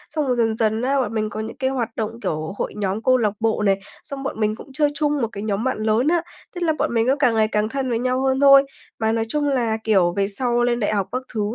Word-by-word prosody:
Xong 300 -3 0
rồi 250 - +1
dần 225 -2 +1
dần 220 0 0
á, 275 +2 +1
bọn 240 - -3
mình 215 -1 -1
có 215 - -6
những 220 +1 -6
cái 260 0 0
hoạt 250 -4 -2
động, 220 -1 -2
kiểu, 155 +3 -3
hội - - -3
nhóm, 200 +1 -2
câu 255 -1 +4
lạc 210 -4 +1
bộ 225 -1 0
này, 195 0 +3 0.2
xong 275 -1 -7
bọn 265 - -4
mình 215 0 +1
cũng 270 - -12
chơi 295 0 +2
chung 295 -2 0
một 230 - +1
cái 200 +1 -6
nhóm 210 +1 -1
bạn 260 - -1
lớn 220 +6 +2
á, 340 0 +3 0.3
tức 350 - -5
là 320 -2 +2
bọn - - 0
mình 225 0 +2
cứ 270 - +4
càng 245 -6 +3
ngày 215 -1 +3
càng 210 0 0
thân 270 0 -2
với 230 -1 0
nhau 255 +1 0
hơn 265 0 +1
thôi. 275 -1 +8 0.4
Mà, 220 0 +1
nói 225 0 0
chung 295 +1 0
là, 235 -5 0
kiểu, 185 -6 +3
về 195 0 +2
sau 240 +3 0
lên 240 0 +1
đại 215 0 0
học 195 -2 0
các 255 - -2
thứ, 215 - -1
230 Hz, 290 wpm, -22 LUFS, 215-265 Hz, 0.4 s, thôi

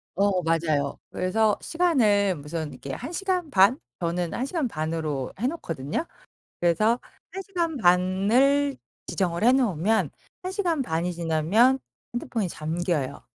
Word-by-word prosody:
어 195 -1 +2
맞아요. 155 -4 0
그래서 210 +3 +1
시간을 220 - +2
무슨 150 +1 -5
이렇게 130 +1 -8
1 275 - -6
시간 365 -3 -1
반? 205 +3 +5 0.2
저는 170 0 -1
1 255 - -1
시간 305 -3 -1
반으로 155 - -3
해 245 - +1
놓거든요. 165 - -3 0.6
그래서 215 +8 +3 0.3
1 385 +1 -5
시간 340 -5 -2
반을 220 +9 +3 0.3
지정을 175 0 -1
해 245 - +7
놓으면 220 - +2 0.3
1 370 - -4
시간 345 -7 0
반이 175 -4 -1
지나면 170 +11 +3 0.4
핸드폰이 230 -5 -2
잠겨요. 160 -2 -2
195 Hz, 260 characters per minute, -25 LUFS, 165-265 Hz, 0.6 s, 해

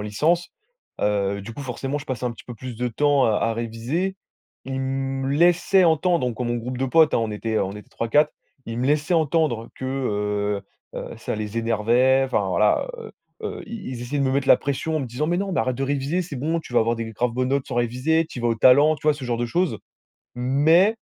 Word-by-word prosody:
licence, 150 +13 0 0.5
heu, 100 -1 0
du 115 +4 -8
coup, 145 - -6
forcément, 135 +2 -3
je 145 - -9
passais 130 -1 -3
un 120 - -2
petit 115 - -14
peu 120 - -8
plus 125 +1 -7
de 125 +2 -1
temps 145 +3 +2
à 110 -2 +2
à 115 +1 0
réviser. 120 +12 -2 0.5
Ils 135 0 -3
me 135 0 -2
laissaient 175 +4 +4
entendre, 165 -2 +2
donc 120 -3 -4
mon 120 0 0
groupe 125 +2 -4
de 130 - -1
potes, 160 +3 +4
hein, - - +3
on 115 -1 -1
était 110 +1 -2
on 95 - -1
était 105 +1 -11
3-4, 145 +7 +2 0.3
ils 115 - -5
me 125 - 0
laissaient 150 +4 +1
entendre 155 -7 +1
que, 130 - -7
heu 105 -6 -1 0.4
heu, - - -7
ça - - -4
les 105 +1 -3
énervait. 120 +4 +3
Enfin, 130 - 0
voilà, - - +2
heu 460 - -9 0.3
heu, - - -5
ils 225 -4 -7
ils 120 - -6
essayaient 140 +4 -3
de 140 - +2
me 130 - +1
mettre 140 0 0
la - - +8
pression 150 +3 -2
en - - 0
me 130 - -3
disant: 125 +6 -2
«Mais 175 +2 +1
non, 195 0 -2
mais - - 0
arrête 125 +2 0
de 135 - -3
réviser, 140 +5 0
c'est 165 -5 -6
bon, 160 +6 -1
tu 125 - -11
vas - - +5
avoir 115 +1 +1
des 115 -1 -4
graves 120 +3 -1
bonnes 125 +2 -1
notes 140 0 0
sans 130 - -5
réviser, 125 +8 +1
tu - - -8
y - - -5
vas 120 - +2
au 115 - +2
talent», 140 +7 +5
tu 155 - -19
vois 150 - +5
ce 140 -3 -8
genre 120 -1 -1
de 120 - -1
choses. 175 +8 0 0.6
Mais, 155 - +3
130 Hz, 240 wpm, -23 LUFS, 115-150 Hz, 0.6 s, la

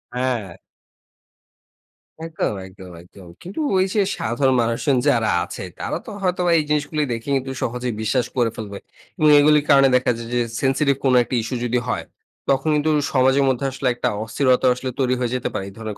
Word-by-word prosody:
হ্যাঁ। 120 -8 -2 1.7
একদম, 165 -8 -2
একদম, 95 -1 -13
একদম। 90 +1 -16
কিন্তু 185 - -7 0.2
ওই 185 - +3
যে 210 - +2 0.2
সাধারণ 130 +4 +1
মানুষজন 115 +4 0
যারা 115 -3 +2
আছে - - -7 0.2
তারা - - -3
তো - - -9
হয়তো 180 -1 0
বা - - +3
এই - - 0
জিনিসগুলোই 150 0 0
দেখে 115 +2 -7
কিন্তু 135 0 -5
সহজেই 125 0 -2
বিশ্বাস 120 +3 0
করে 120 -2 +3
ফেলবে। 100 -3 -7 0.4
এবং 155 - +4
এগুলির 150 0 +4
কারণে 135 0 +6
দেখা 125 0 +2
যায় 115 0 -7
যে 120 - +2 0.2
সেনসিটিভ 140 +1 +2
কোনো 130 -1 +4
একটা 125 - -4
ইস্যু 120 +3 -4
যদি 120 +1 +1
হয়, 125 - -2 0.4
তখন 135 +2 +1
কিন্তু 150 +1 +1 0.2
সমাজের 130 +1 +3
মধ্যে 130 +1 -1
আসলে 135 0 -3
একটা - - -1
অস্থিরতা 130 +3 +2
আসলে 130 +1 -5
তৈরি 130 -1 +2
হয়ে 120 -2 -1
যেতে 125 - -2
পারে, 95 - -3
এই - - -14
ধরনের 110 -2 -6
130 Hz, 185 wpm, -21 LUFS, 115-140 Hz, 1.7 s, কারণে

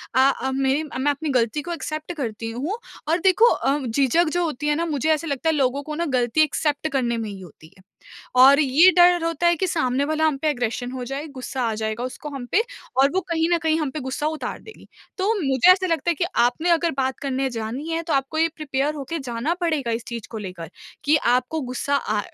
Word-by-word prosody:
अ - - +4 0.2
अ, 265 - -1
मेरी 270 +3 +1
मैं 290 -1 -1
अपनी 300 +2 -4
ग़लती 250 +1 +1
को 345 - -6
एक्सेप्ट 310 +1 -5
करती 225 -7 -4
हूँ 290 - -3 0.3
और 330 +3 +2
देखो 380 +5 +4
अ, 275 - +1
झिझक 275 +7 +2
जो 350 0 +1
होती 295 -3 -3
है 295 - +2
ना 335 +2 -1
मुझे 310 -2 -1
ऐसा 315 +2 -3
लगता 285 +2 -1
है 320 - +2
लोगों 275 0 0
को 305 +1 -6
ना 340 +2 -1
ग़लती 255 0 +1
एक्सेप्ट 300 0 -1
करने 245 -4 0
में 225 -2 -4
ही 200 -1 -8
होती 160 -2 -15
है 185 - -20 0.5
और 275 +3 +8
ये 305 +6 +6
डर 350 -1 +6
होता 330 +1 0
है 345 - +5
कि 375 - 0
सामने 275 -5 0
वाला 315 +1 0
हम 305 -3 +1
पे 310 - +2
एग्रेशन 245 -3 -2
हो 255 -1 -5
जाए, 275 +4 -5
ग़ुस्सा 260 -2 -5
आ 220 - -2
जाएगा 220 +2 -3
उसको 255 +4 -6
हम 275 -3 -6
पे 415 - +4 0.4
और 270 +2 +5
वो 375 - +1
कहीं 325 -1 +1
न 340 - +4
कहीं 320 0 +2
हम 300 -3 -1
पे 305 - -5
ग़ुस्सा 260 +3 -3
उतार 310 0 -3
देगी। 440 - -14 0.3
तो 390 +4 +2
मुझे 270 +2 +4
ऐसा 370 0 0
लगता 335 0 0
है - - +1
कि 345 - -1 0.2
आपने 245 +8 +1
अगर 335 0 +3
बात 265 -1 -1
करने 270 -1 -1
जानी 235 +6 -5
है 330 0 -1
तो 330 -1 -3
आपको 270 +3 0
ये 325 +1 +3
प्रिपेयर 290 -1 -1
होके 295 +3 -4
जाना 260 +3 -2
पड़ेगा 310 -8 0
इस 230 0 -2
चीज़ 235 -3 -6
को 225 - -5
लेकर 180 -5 -7 0.3
कि 300 +1 +4 0.2
आपको 255 +6 0
ग़ुस्सा 260 +2 -1
अ 215 -6 -1
285 Hz, 235 wpm, -23 LUFS, 250-320 Hz, 0.5 s, और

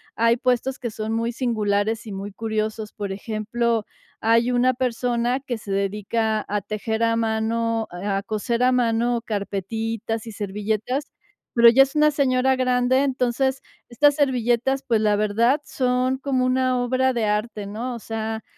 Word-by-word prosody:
hay 230 +1 +3
puestos 255 +2 0
que 240 -3 -4
son 215 +1 -4
muy 230 +1 0
singulares 220 -2 0
y 210 - -7
muy 195 +1 -6
curiosos. 220 0 -3
Por 200 -2 -5
ejemplo, 220 +2 -1 0.3
hay 230 +2 +3
una 250 +1 +3
persona 245 0 0
que 255 -4 -4
se 205 -2 -8
dedica 210 +2 -1
a 205 0 -1
tejer 220 +2 -3
a 230 0 +2
mano, 225 0 0
eh, 200 - -6
a 195 -1 0
coser 230 +3 -2
a 255 - +4
mano 235 -1 +1
carpetitas 220 +2 -3
y 225 - -6
servilletas, 215 +6 -3 0.4
pero 235 0 +8
ya 265 +3 +6
es 275 +3 -6
una 300 0 +4
señora 265 -2 +2
grande. 255 0 +2
Entonces, 265 0 0 0.3
estas 290 +5 +4
servilletas, 265 -1 +1
pues, 225 -3 +2
la 210 -1 +3
verdad, 230 +7 +2
son 255 0 0
como 265 -2 0
una 255 0 +1
obra 260 +1 +1
de 235 -3 0
arte, 210 0 -1
¿no? 235 +5 -4
O - - -7
sea, 220 0 -4
230 Hz, 160 wpm, -23 LUFS, 215-255 Hz, 0.4 s, pero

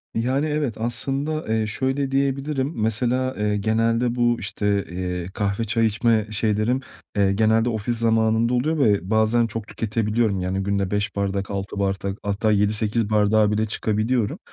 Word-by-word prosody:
Yani, 130 +6 0
evet 150 -7 -1
aslında, 135 +7 -2
eee, 110 0 0
şöyle 135 +4 -1
diyebilirim. 135 +1 0
Mesela, 125 +4 0
eee, 105 0 0
genelde 115 +3 +1
bu, 120 -1 +2
işte, 100 0 -1
eee, 90 0 -4
kahve, 100 +1 -1
çay 115 +2 +1
içme 110 0 +2
şeylerim, 110 +4 +1 0.4
eee, 100 -1 +3
genelde 110 +3 +2
ofis 115 +1 -2
zamanında 115 +1 +2
oluyor 155 +6 0
ve 100 - +2
bazen 110 +2 +3
çok 110 -1 -5
tüketebiliyorum, 110 -2 -1
yani, 95 +1 -2
günde 100 -1 -1
5 105 0 -1
bardak, 100 -1 -2
6 100 0 -4
bardak 100 0 -1
hatta 105 +2 0
7-8 105 +1 +1
bardağa 105 0 +3
bile 110 +1 +1
çıkabiliyorum. 110 +1 -1
110 Hz, 150 wpm, -23 LUFS, 100-120 Hz, 0.4 s, eee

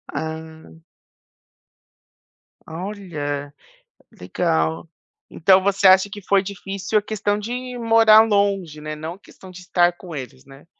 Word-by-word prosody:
Ah. 160 - -6 2.0
Olha, 160 -6 -5 0.6
legal. 80 - -2 0.4
Então 190 +3 +4
você 200 0 +2
acha 190 +1 +5
que 205 0 -9
foi 195 +1 +2
difícil 195 +1 -3
a - - -3
questão 205 -1 -2
de 250 +4 -6
morar 225 -2 +6
longe, 200 -7 0
né, 155 0 -6
não 160 +2 -7
a - - -17
questão 190 -2 -16
de 185 0 -12
estar 175 -1 +2
com 175 -3 -11
eles, 130 -1 -8
né? 135 +2 -17
185 Hz, 130 wpm, -21 LUFS, 160-205 Hz, 2.0 s, morar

